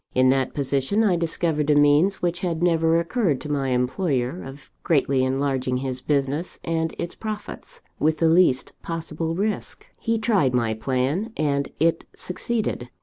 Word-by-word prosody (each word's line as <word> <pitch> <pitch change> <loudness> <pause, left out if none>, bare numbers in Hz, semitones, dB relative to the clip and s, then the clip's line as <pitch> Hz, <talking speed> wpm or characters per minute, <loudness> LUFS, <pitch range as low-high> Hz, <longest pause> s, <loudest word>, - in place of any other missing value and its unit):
In 130 0 +5
that 130 -1 +1
position, 140 +9 +1
I 195 -5 +3
discovered 165 -3 -1
a 150 - +5
means, 145 +7 +4
which 175 0 0
had 170 -2 -2
never 165 -1 +3
occurred 170 - 0
to 150 - -5
my 135 -2 0
employer, 130 +3 0
of 135 +1 -11
greatly 135 -4 +2
enlarging 130 -1 0
his 130 -1 -2
business 145 +4 0
and 165 -1 -1
its 170 - -4
profits, 220 - -7 0.2
with 155 +1 +2
the 165 - +3
least 160 -6 +3
possible 165 0 -4
risk. 210 +4 -3
He 230 -1 0
tried 200 - +2
my 115 -3 +1
plan, 130 - -1
and 140 -2 0
it 165 +1 +1
succeeded. 195 - -3
155 Hz, 155 wpm, -23 LUFS, 135-175 Hz, 0.2 s, In